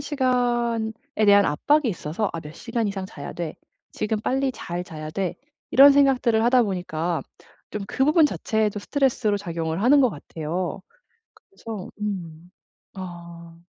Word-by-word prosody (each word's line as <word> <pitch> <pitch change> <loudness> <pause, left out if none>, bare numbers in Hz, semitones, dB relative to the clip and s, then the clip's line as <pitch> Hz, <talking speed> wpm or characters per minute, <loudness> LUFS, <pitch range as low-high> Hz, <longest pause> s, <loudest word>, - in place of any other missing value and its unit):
시간에 245 -5 0 0.3
대한 205 0 +6
압박이 285 - +2
있어서 180 +1 -2
'아 165 - -4
몇 150 0 -10
시간 230 0 -2
이상 195 -1 -4
자야 145 -6 -8
돼.', 170 -3 -5 0.4
'지금 215 0 -1
빨리 265 +4 0
잘 175 -5 -5
자야 155 -2 -7
돼.' 185 +1 -2 0.4
이런 280 +2 +8
생각들을 255 -5 +3
하다 245 +1 +5
보니까 175 -4 -2 0.5
좀 210 - -4
그 265 - +1
부분 305 +2 +5
자체에도 215 -6 -1
스트레스로 245 -4 +1
작용을 165 -2 -3
하는 280 +5 +6
것 255 -4 +4
같아요. 170 +4 -4 0.7
그래서 225 - -8
음. 175 -4 -5 0.4
아. 170 -2 -10
205 Hz, 290 characters per minute, -24 LUFS, 170-245 Hz, 0.7 s, 이런